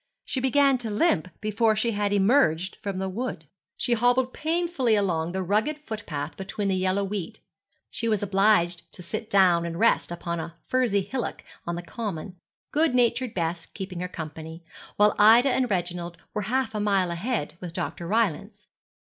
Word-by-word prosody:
She 265 Hz, -, -1 dB
began 270 Hz, 0 st, +3 dB
to 230 Hz, -2 st, -4 dB
limp 210 Hz, -, +2 dB
before 215 Hz, +1 st, +2 dB
she 230 Hz, +2 st, 0 dB
had 205 Hz, -1 st, -1 dB
emerged 195 Hz, -, +3 dB
from 200 Hz, -3 st, -3 dB
the 190 Hz, 0 st, -2 dB
wood. 190 Hz, -4 st, -4 dB, 0.3 s
She 245 Hz, -, +1 dB
hobbled 245 Hz, +2 st, +2 dB
painfully 320 Hz, -7 st, +1 dB
along 175 Hz, -5 st, 0 dB
the 190 Hz, +1 st, -2 dB
rugged 215 Hz, -, +1 dB
footpath 165 Hz, -9 st, -5 dB
between 195 Hz, +1 st, -3 dB
the 190 Hz, -, +1 dB
yellow 185 Hz, +2 st, +1 dB
wheat. 205 Hz, +1 st, -4 dB, 0.5 s
She 230 Hz, -, -2 dB
was 215 Hz, -3 st, +1 dB
obliged 195 Hz, -3 st, +2 dB
to 180 Hz, -, -8 dB
sit 215 Hz, +5 st, -5 dB
down 180 Hz, -4 st, +5 dB
and 170 Hz, 0 st, -4 dB
rest 230 Hz, +5 st, +3 dB
upon 170 Hz, 0 st, -3 dB
a 165 Hz, +1 st, -6 dB
furzy 245 Hz, -6 st, +2 dB
hillock 245 Hz, +5 st, -4 dB, 0.2 s
on 170 Hz, -, -1 dB
the 175 Hz, -, -5 dB
common, 195 Hz, -3 st, -5 dB, 0.4 s
good 305 Hz, -3 st, +2 dB
natured 245 Hz, 0 st, +1 dB
Bess 170 Hz, -1 st, -2 dB
keeping 190 Hz, -3 st, -7 dB
her 180 Hz, -, -2 dB
company, 160 Hz, 0 st, -8 dB, 0.3 s
while 210 Hz, 0 st, +4 dB
Ida 230 Hz, +6 st, +7 dB
and 255 Hz, 0 st, +1 dB
Reginald 175 Hz, -2 st, -2 dB, 0.2 s
were 210 Hz, -, -1 dB
half 260 Hz, -1 st, 0 dB
a 210 Hz, -, -2 dB
mile 195 Hz, -4 st, +1 dB
ahead 185 Hz, -, -2 dB
with 180 Hz, -2 st, -6 dB
Dr. 170 Hz, 0 st, -4 dB
Rylance. 210 Hz, 0 st, -1 dB
205 Hz, 175 wpm, -26 LUFS, 175-230 Hz, 0.5 s, Ida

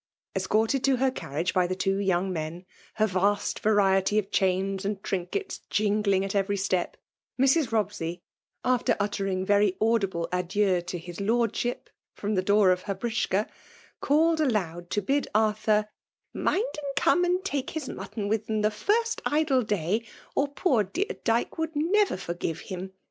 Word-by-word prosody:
Escorted 225 Hz, +5 st, +1 dB
to 270 Hz, -1 st, +4 dB
her 260 Hz, +1 st, +2 dB
carriage 165 Hz, -, -3 dB
by 180 Hz, -1 st, +3 dB
the 185 Hz, -, -2 dB
two 195 Hz, +1 st, 0 dB
young 190 Hz, -1 st, +1 dB
men, 165 Hz, +2 st, -5 dB, 0.3 s
her 215 Hz, -, +3 dB
vast 200 Hz, +1 st, 0 dB
variety 200 Hz, -1 st, +3 dB
of 205 Hz, -2 st, 0 dB
chains 190 Hz, +1 st, +1 dB
and 200 Hz, 0 st, -3 dB
trinkets 195 Hz, -, -3 dB
jingling 205 Hz, -2 st, +2 dB
at 195 Hz, -, -4 dB
every 200 Hz, 0 st, +1 dB
step, 185 Hz, -2 st, -1 dB, 0.4 s
Mrs. 270 Hz, +1 st, +3 dB
Robsey, 180 Hz, -5 st, -2 dB, 0.4 s
after 250 Hz, -1 st, +2 dB
uttering 195 Hz, -2 st, -1 dB
very 200 Hz, -1 st, +3 dB
audible 200 Hz, -6 st, +1 dB
adieux 180 Hz, +1 st, +1 dB
to 175 Hz, +1 st, -5 dB
*'his 175 Hz, +2 st, -8 dB
Lord* 230 Hz, +2 st, +1 dB
ship 245 Hz, +1 st, -2 dB
" -, -, -67 dB
from 210 Hz, +1 st, -2 dB
the 185 Hz, -, +2 dB
door 200 Hz, 0 st, +4 dB
of 180 Hz, 0 st, +1 dB
her 195 Hz, -, 0 dB
britschka» 220 Hz, -3 st, -1 dB, 0.5 s
called 315 Hz, +2 st, +3 dB
aloud 175 Hz, -, -1 dB
to 205 Hz, -, -1 dB
bid 280 Hz, +7 st, +1 dB
Arthur 215 Hz, 0 st, +2 dB, 0.3 s
*' -, -, -57 dB
mind -, -, 0 dB, 0.2 s
and 280 Hz, -2 st, -5 dB
come 355 Hz, +5 st, +3 dB
and 360 Hz, +2 st, +1 dB
take 285 Hz, -9 st, -2 dB
his 310 Hz, -4 st, -5 dB
mutton 210 Hz, -5 st, -5 dB
with 220 Hz, +1 st, -1 dB
them 215 Hz, -1 st, 0 dB
the 215 Hz, -, +3 dB
first 450 Hz, -, 0 dB
idle 295 Hz, -3 st, +2 dB
day, 210 Hz, 0 st, -1 dB, 0.3 s
or 285 Hz, -, +1 dB
poor 280 Hz, -, +1 dB
dear 350 Hz, -, -2 dB
Dyke 230 Hz, +7 st, 0 dB
would 320 Hz, -1 st, -2 dB
neVer 380 Hz, -, +2 dB
forgive 170 Hz, -2 st, -4 dB
him. 190 Hz, -1 st, -6 dB
210 Hz, 170 wpm, -27 LUFS, 190-255 Hz, 0.5 s, to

